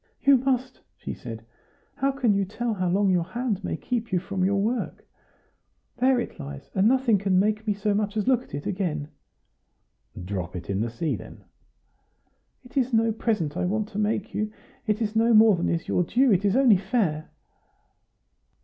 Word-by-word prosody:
"You 275 -1 +6
must," 255 0 -1 0.2
she - - -6
said; 115 -2 -8 0.5
"how 275 +1 0
can 255 -6 +1
you 200 0 +1
tell 225 +4 -3
how 185 -3 -1
long 195 +2 +2
your 180 -2 +2
hand 210 +2 -3
may - - -2
keep 235 -3 -3
you 185 - +2
from 190 +1 -2
your 200 +1 +2
work? 230 +5 -2 0.9
There 255 0 +3
it 235 - -5
lies; 140 -1 -8
and 195 +2 +3
nothing 250 -4 +3
can 190 -1 +1
make 215 +3 +1
me 205 - +1
so 205 +1 0
much 210 +1 -1
as 210 - -1
look 255 -2 +4
at 250 - -9
it 145 - -6
again." 160 -7 -2 1.2
"Drop 90 -2 -4
it 90 +2 -5
in 100 +1 -1
the 115 - -1
sea, 130 +4 -2
then." 90 - -11 1.2
"It 250 - -10
is 255 -1 +1
no 225 0 +3
present 210 -9 -1
I - - -1
want 210 +3 -1
to 205 - -5
make 210 0 -1
you; 215 0 -2 0.4
it 215 +2 +1
is 215 0 -3
no 230 +1 +4
more 215 -1 +7
than 170 - -1
is 165 - -2
your - - +1
due; 250 +8 +3
it 195 0 +2
is 200 +1 +2
only 255 -7 +6
fair." 190 -6 -1
205 Hz, 195 wpm, -25 LUFS, 180-235 Hz, 1.2 s, more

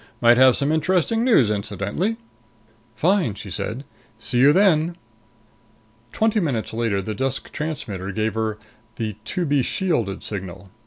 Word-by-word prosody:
Might 120 0 +5
have 130 -1 +6
some 140 +2 0
interesting 185 +7 +1
news, 220 - +4
too, - - +2
incidentally." 105 - -2 0.8
"Fine," 165 - +1
she 100 -1 -8
said. 115 - -4 0.3
"See 120 +2 -1
you 140 +3 +7
then." 170 -2 +3 1.2
Twenty 220 0 +1
minutes 130 - -2
later 110 -4 -1
the 110 - -4
desk 135 +5 -2
transmitter 110 - -4
gave 110 +1 -1
her 110 -1 -2 0.4
the 110 -3 -4
"to 180 - -2
be 145 -2 +2
shielded" 120 - -1
signal. 95 -2 -7
120 Hz, 145 wpm, -22 LUFS, 105-165 Hz, 1.2 s, you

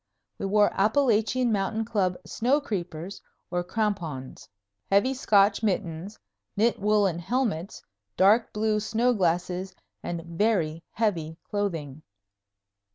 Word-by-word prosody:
We 195 - -2
wore 205 +1 +4
Appalachian 225 +2 +2
Mountain 215 +2 0
Club 195 -5 0
snow 255 +6 +1
creepers, 180 - -5 0.3
or 175 0 0
crampons, 175 - -3 0.4
heavy 205 +7 +3
Scotch 210 -5 +3
mittens, 190 -2 -2 0.4
knit 225 +3 +2
woolen 200 -4 +2
helmets, 195 -3 -2 0.3
dark 210 +5 +4
blue 215 0 0
snow 225 +4 +1
glasses, 180 -1 -1 0.3
and 170 -1 -4
very 170 -3 0
heavy 165 -8 -1
clothing. 165 -9 -3
200 Hz, 105 wpm, -26 LUFS, 175-220 Hz, 0.4 s, wore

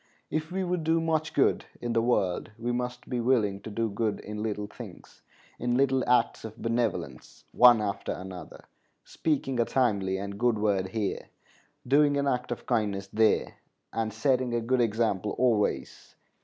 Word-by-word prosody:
If 155 +1 -2
we 190 +1 -1
would 180 -2 -1
do 165 +1 +2
much 160 -1 0
good 140 - +2
in 120 -1 -3
the 115 - +3
world 105 -7 0
we 120 +1 -2
must 125 0 -3
be 125 - -2
willing 110 -5 +1
to - - -7
do 115 +2 -1
good 110 +1 -1
in 105 0 -6
little 105 -1 -2
things, - - -12 0.4
in 120 0 0
little 135 -1 +2
acts 125 -2 +2
of 110 0 -8
benevolence 115 -3 -3
one 120 -2 +7
after 100 -1 -3
another; 95 -1 -8 0.4
speaking 135 -5 -1
a 120 - +3
timely 100 -8 +1
and 100 +1 -6
good 120 -2 +2
word 100 -3 +1
here, 105 +1 -3 0.6
doing 145 +2 +4
an 140 - +1
act 125 -2 -1
of 120 - -5
kindness 100 -5 -1
there, 110 0 +2 0.4
and 115 -1 -1
setting 130 -3 +1
a - - +2
good 125 +2 +1
example 110 -3 0
always. 115 -4 0
115 Hz, 170 wpm, -28 LUFS, 105-130 Hz, 0.6 s, one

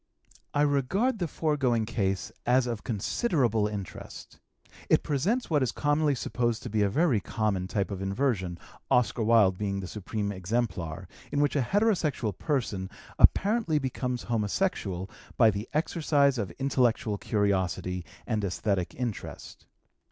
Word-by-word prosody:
I 145 - +2
regard 165 - +1
the 175 - 0
foregoing 135 -8 +1
case 100 -1 -1
as 125 +1 +3
of 120 -3 -4
considerable 115 - +1
interest. 100 -3 -8 0.5
It - - +4
presents 195 - 0
what 150 -2 +3
is 125 -3 +1
commonly 145 0 +1
supposed 120 -2 -1
to - - -6
be 110 -1 +1
a 100 - +3
very 145 - +2
common 100 -2 -1
type 100 +1 -1
of 95 -1 -4
inversion, 95 -3 -1 0.3
Oscar 120 0 +2
Wilde 105 -4 +4
being 100 -2 -1
the 95 - -5
supreme 105 +2 -3
exemplar, 95 -4 -2 0.2
in 145 - 0
which 145 0 +2
a 140 - +3
heterosexual 155 - +1
person 110 - -2 0.3
apparently 205 -6 +4
becomes 125 -3 -2
homosexual 105 - -1 0.3
by 115 -3 +6
the 100 +2 -5
exercise 150 -4 +2
of 100 -4 -2
intellectual 120 -6 +1
curiosity 95 -3 0 0.2
and 110 -3 -1
esthetic 95 -1 -1
interest. 120 -4 -6
115 Hz, 135 wpm, -28 LUFS, 100-145 Hz, 0.5 s, by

